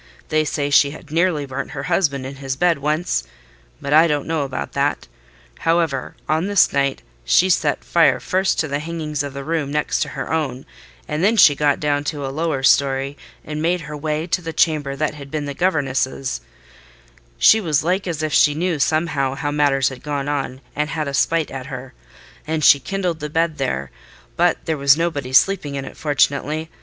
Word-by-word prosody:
They 155 0 +2
say 145 -1 -2
she 140 0 +5
had 150 +1 -12
nearly 165 -3 +1
burnt 135 +1 -5
her 140 - -3
husband 150 -5 0
in 135 +1 -7
his 135 -1 -4
bed 170 +1 +2
once: 150 - -1 0.6
but 140 - -2
I 160 +2 +7
don't 145 -3 -1
know 160 -2 -1
about 135 -2 -4
that. - - -1 0.5
However, 165 -5 0
on 160 +5 0
this 205 -3 +3
night, 140 -1 0 0.2
she 180 - +4
set - - +1
fire - - +3
first 190 +1 0
to 160 - -3
the 140 0 -2
hangings 155 -2 -4
of 140 -1 -5
the 140 - -5
room 155 -1 -2
next 150 0 0
her - - -5
own, 135 -5 -2 0.4
and 150 +3 -2
then 220 +3 +3
she 150 - +8
got 145 0 +1
down 145 -1 0
to 145 -2 -3
a 135 - -4
lower 155 -3 -1
storey, 135 +1 +2 0.3
and 150 0 -4
made 175 +2 +1
her 150 -1 -7
way 150 +1 -2
to 180 +1 -1
the 165 -1 -6
chamber 150 -5 +1
that 150 +1 -1
had 140 -2 -10
been 150 0 -3
the 140 - -4
governess's—(she 135 - -1 1.2
was 155 -7 +1
like 185 +3 0
as 160 -3 -3
if 155 -1 -2
she 145 -1 +4
knew 170 -1 -1
somehow 155 -2 0
how 145 +1 -3
matters 145 -2 +2
had 130 -2 -10
gone 145 -1 -3
on, 135 -2 -3
and 150 +1 -1
had 155 -2 -3
a 140 - -4
spite 165 +2 +1
at 130 -1 -6
her)—and 130 - -8
she 140 - +7
kindled 180 0 -3
the 150 - -5
bed 165 0 0
there; 70 - -2 0.4
but - - +3
there 160 -1 -1
was 140 +1 +5
nobody 145 -6 -2
sleeping 145 0 +3
in 135 -1 -4
it, - - -10
fortunately. 150 +2 0
150 Hz, 195 wpm, -20 LUFS, 140-160 Hz, 1.2 s, she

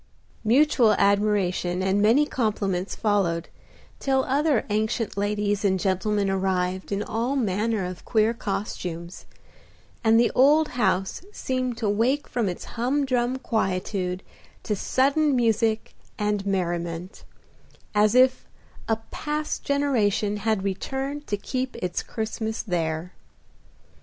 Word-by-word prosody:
Mutual 240 -1 +4
admiration 200 -3 +1
and 190 +1 +2
many 235 +8 +5
compliments 205 -8 -1
followed, 190 -6 0 0.5
till 265 -1 +1
other 280 -1 +1
ancient 220 +1 -1
ladies 205 0 0
and 190 -2 +2
gentlemen 200 +2 0
arrived 190 -1 -1
in 200 +1 0
all 235 +6 -1
manner 215 -3 0
of 180 0 -7
queer 220 0 +2
costumes, 180 -5 -5 0.8
and 225 0 +5
the 235 - +3
old 295 +4 +5
house 195 - 0
seemed 255 - -2
to 225 - -1
wake 235 +8 +1
from 230 -5 -1
its 180 - -5
humdrum 255 0 0
quietude 190 -5 -2 0.4
to 210 - -1
sudden 280 +7 +2
music 225 -2 +1 0.2
and 210 -1 -1
merriment, 175 -1 -2 0.7
as 210 +2 +3
if 255 0 +4 0.4
a 225 - +4 0.2
past 300 0 -3
generation 225 -8 +1
had 215 -2 0
returned 270 +9 -3
to 205 - -1
keep 255 +5 -3
its 180 -1 -2
Christmas 220 0 -4
there. 170 -2 -2
215 Hz, 115 wpm, -25 LUFS, 190-250 Hz, 0.8 s, many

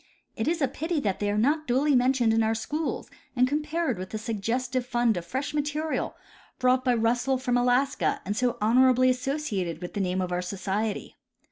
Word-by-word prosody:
It 220 - -2
is 330 -1 +1
a - - +4
pity 320 +4 -2
that 200 -5 -1
they 205 - 0
are 205 - 0
not 295 +7 +1
duly 270 +4 +3
mentioned 250 -2 +3
in 225 - +3
our 220 0 +1
schools 300 +8 -3 0.3
and 250 0 +4
com 295 +3 0
pared 305 - -2
with 185 0 -6
that 220 - -4
suggestive 235 +4 -2
fund 240 -2 +1
of 170 -1 -5
fresh 265 +8 -3
material 300 +1 -2 0.4
brought 255 0 +2
by 250 -1 +2
Russell 240 +3 +1
from 250 -1 -1
Alaska 250 +3 +2
and 205 - -2
so 245 +1 0
honorably 255 +3 +4
associated 250 - -2
with 175 0 -7
the 205 - -2
name 185 0 -1
of 180 -1 -2
our 180 0 0
society. 200 +3 -3
245 Hz, 200 wpm, -27 LUFS, 215-270 Hz, 0.4 s, a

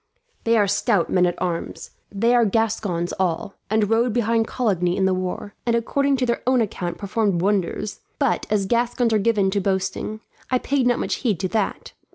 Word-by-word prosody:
"They 230 0 +4
are 205 - +4
stout 205 -2 +1
men 180 -1 +4
at 175 - -3
arms. 170 -2 -4 0.2
They 230 +4 +2
are 240 -1 +5
Gascons 205 -5 0
all, 185 +1 -1 0.2
and 215 0 +2
rode 230 +2 +2
behind 230 -1 +1
Coligny 180 -8 0
in 190 - +2
the 190 - +2
war, 185 +2 -4
and 235 -1 +1
according 275 +4 +1
to 255 - +1
their 235 -1 -1
own 255 -1 +4
account 180 -6 -2
performed 200 -2 0
wonders; 200 +2 -1 0.2
but 275 -5 0
as 205 -2 +1
Gascons 235 +2 +1
are 215 - +3
given 200 -2 +2
to 200 0 0
boasting, 195 +3 -2 0.3
I 255 - +3
paid 265 0 0
not 245 - +3
much - - -2
heed 215 -10 -1
to 190 - 0
that. 215 -2 -2
210 Hz, 195 wpm, -22 LUFS, 190-235 Hz, 0.3 s, are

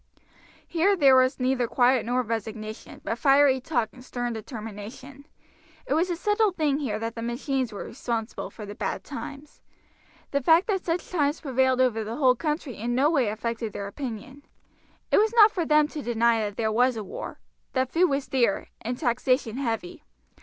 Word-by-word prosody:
Here 365 +4 +2
there 275 -5 +6
was 255 +1 +3
neither 255 -1 +1
quiet 245 0 +3
nor 250 +1 +1
resignation, 220 -1 -6
but 230 - -3
fiery 275 -1 +5
talk 240 -6 -1
and 250 - -14
stern 245 -2 -3
determination; 225 +5 -8 0.6
it - - -1
was 335 +4 +2
a 350 - 0
settled 415 +2 +1
thing 295 -3 +1
here 235 -8 -2
that 225 +1 -4
the 230 - -6
machines 250 +1 -2
were 205 - -6
responsible 230 -2 -4
for 215 - -9
the 205 - -7
bad - - -3
times. 285 +1 -9 0.7
The 280 - +1
fact 325 +6 +5
that 385 -4 -1
such 340 +1 -2
times 295 -3 +1
prevailed 260 -2 +2
over 230 -4 +2
the 220 +2 -5
whole 260 -3 +4
country 300 -2 -3
in 240 +3 -2
no 280 +5 +3
way 270 -8 +2
affected 225 0 -3
their 200 - -5
opinion. 255 +4 -7 0.7
It - - +5
was 440 +2 +2
not 435 -2 +8
for 345 -6 -2
them 300 0 +4
to 305 - -6
deny 235 -2 +2
that 205 -2 -3
there 220 -1 0
was 245 +2 +2
a 215 - -4
war, 190 - -7 0.3
that 260 -1 0
food 355 +2 +3
was 275 -1 -1
dear, 240 -7 +1
and 245 +3 -3
taxation 250 -2 0
heavy. 280 +6 -3
255 Hz, 185 wpm, -26 LUFS, 230-290 Hz, 0.7 s, not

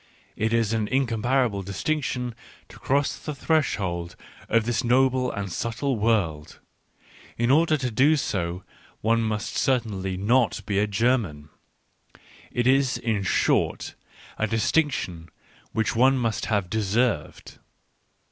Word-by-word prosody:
It 110 +1 -1
is 115 -2 +1
an 110 -2 0
incompar 130 +1 +1
able 100 -4 -3
distinction 125 +5 -2 0.4
to - - -14
cross 140 +1 +1
the 150 - -6
threshold 95 - -1 0.3
of 115 -1 +2
this 120 +1 0
noble 130 +1 +2
and 100 -3 -5
subtle 120 - -2
world 100 -9 -1 0.4
— - - -24
in 120 +2 +2
order 155 +1 +4
to 130 -3 -3
do 140 +8 +4
so 90 - -2 0.4
one 115 +1 +2
must 110 -1 -2
certainly 100 -8 0
not 115 +5 +2
be 100 -1 0
a 105 - +2
German; 100 - 0 1.0
it 120 - -1
is, 130 0 +3
in 110 -4 -1
short, 95 - +1 0.5
a 110 - +1
distinc 140 +8 +2
tion 85 -8 -5 0.4
which 110 0 -1
one 130 +3 +4
must 115 -3 -1
have 100 -4 0
deserved. 110 -2 -1
115 Hz, 135 wpm, -25 LUFS, 100-130 Hz, 1.0 s, order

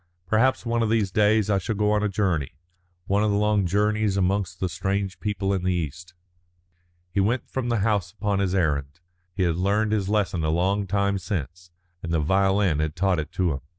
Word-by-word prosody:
Perhaps 115 +7 +2
one 115 0 0
of 115 - +1
these 110 -4 +1
days 105 0 +3
I 100 -2 +2
shall 105 +4 -3
go 105 +1 +1
on 105 0 +2
a 105 - 0
journey, 90 -9 -1 0.5
one 100 +2 +1
of 110 - +2
the 100 - +1
long 105 -2 +2
journeys 105 +1 +1
amongst 95 -1 0
the 95 - 0
strange 95 +1 -2
people 100 -2 -1
in 95 - -1
the 90 0 +1
East." 85 +3 -5 1.0
He 100 - -1
went 110 +6 0
from 130 -2 -3
the 115 -3 +1
house 100 -4 0
upon 100 -1 -1
his 95 -1 0
errand. 75 -3 -1 0.4
He 95 - 0
had 85 -2 +1
learned 105 +4 +1
his 100 -3 0
lesson 100 -5 0
a 80 - 0
long 95 +5 +1
time 100 +1 0
since, 85 -1 -5 0.3
and 85 - -5
the 80 - +2
violin 95 0 +2
had 75 0 -1
taught 95 -1 +1
it 75 - -4
him. 85 -7 +1
95 Hz, 205 wpm, -25 LUFS, 90-105 Hz, 1.0 s, days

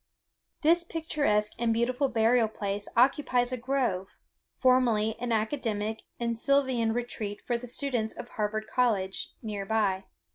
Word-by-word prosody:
This 335 +3 +5
picturesque 290 -11 0
and 235 -1 +2
beautiful 250 +4 +1
burial 230 0 +3
place 205 -1 -3
occupies 250 -1 +3
a - - 0
grove, 245 -7 -1 0.5
formerly 235 -4 +3
an 245 0 -3
academic 220 -2 -1 0.2
and 235 -1 -1
sylvan 260 -4 +2
retreat 220 -3 -4
for 240 - 0
the 240 +1 -5
students 240 -3 -1
of - - -7
Harvard 215 0 -2
College, 215 -7 0
near 210 -3 -3
by. 195 -2 0
230 Hz, 135 wpm, -28 LUFS, 215-255 Hz, 0.5 s, This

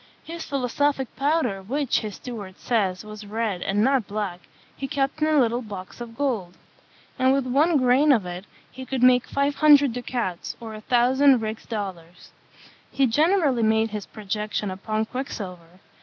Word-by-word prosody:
His 335 0 -7
philosophic 275 0 -1
powder, 275 -8 0
which, 265 +7 0
his 215 -3 -6
steward 205 -7 -8
says, 200 -5 -1
was 215 0 -9
red, 210 -3 -2
and 200 +3 +1
not 265 -3 +2
black, 200 -4 -3 0.4
he 270 - -5
kept 275 +1 -1
in 305 - +3
a 310 -1 +3
little 240 -1 +2
box 200 -1 -9
of 230 -1 -8
gold; 220 -11 -2 0.6
and 260 0 +4
with 270 -1 +1
one 295 +6 +3
grain 260 +3 +4
of 225 -8 +3
it 180 +2 -6 0.3
he 260 - -8
could 260 -1 -2
make 250 -1 +5
five 280 +1 0
hundred 290 -4 +6
ducats, 240 -7 -4
or 225 -2 -8
a 215 - -8
thousand 255 +2 +4
rix 220 0 -5
dollars. 185 -6 -6 0.6
He 275 - +2
generally 295 - +2
made 220 0 +2
his 210 -2 -5
projection 210 -1 -3
upon 215 +3 -2
quicksilver. 185 -9 -7
235 Hz, 165 wpm, -24 LUFS, 205-270 Hz, 0.6 s, hundred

